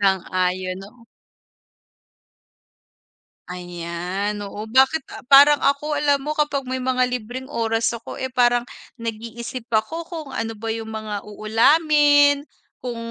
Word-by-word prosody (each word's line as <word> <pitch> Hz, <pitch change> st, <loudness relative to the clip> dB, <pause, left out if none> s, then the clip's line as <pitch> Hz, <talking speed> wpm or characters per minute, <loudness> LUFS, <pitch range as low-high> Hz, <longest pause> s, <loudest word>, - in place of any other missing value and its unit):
Sang-ayon, 185 Hz, -1 st, 0 dB
'no. 230 Hz, +4 st, -14 dB, 2.4 s
Ayan, 180 Hz, +3 st, -4 dB
oo. 205 Hz, +1 st, -6 dB
Bakit 265 Hz, +6 st, +3 dB
ah, -, -, -8 dB
parang 285 Hz, +1 st, +8 dB
ako 280 Hz, +2 st, +1 dB
alam 290 Hz, -1 st, +2 dB
mo, 305 Hz, -, -1 dB
kapag 290 Hz, -3 st, -1 dB
may 260 Hz, 0 st, -3 dB
mga 255 Hz, 0 st, +1 dB
libreng 250 Hz, +1 st, -5 dB
oras 225 Hz, -4 st, -1 dB
ako, 230 Hz, 0 st, -8 dB
eh, 260 Hz, -1 st, -4 dB
parang 245 Hz, -1 st, +3 dB, 0.3 s
nag-iisip 230 Hz, +2 st, -6 dB
ako 230 Hz, +10 st, 0 dB
kung 320 Hz, -5 st, -7 dB
ano 225 Hz, -1 st, -3 dB
ba 225 Hz, +1 st, -3 dB
'yung 225 Hz, 0 st, -6 dB
mga 215 Hz, -2 st, -5 dB
uulamin. 290 Hz, +7 st, +4 dB, 0.4 s
Kung 245 Hz, -2 st, -5 dB
235 Hz, 125 wpm, -22 LUFS, 215-280 Hz, 2.4 s, parang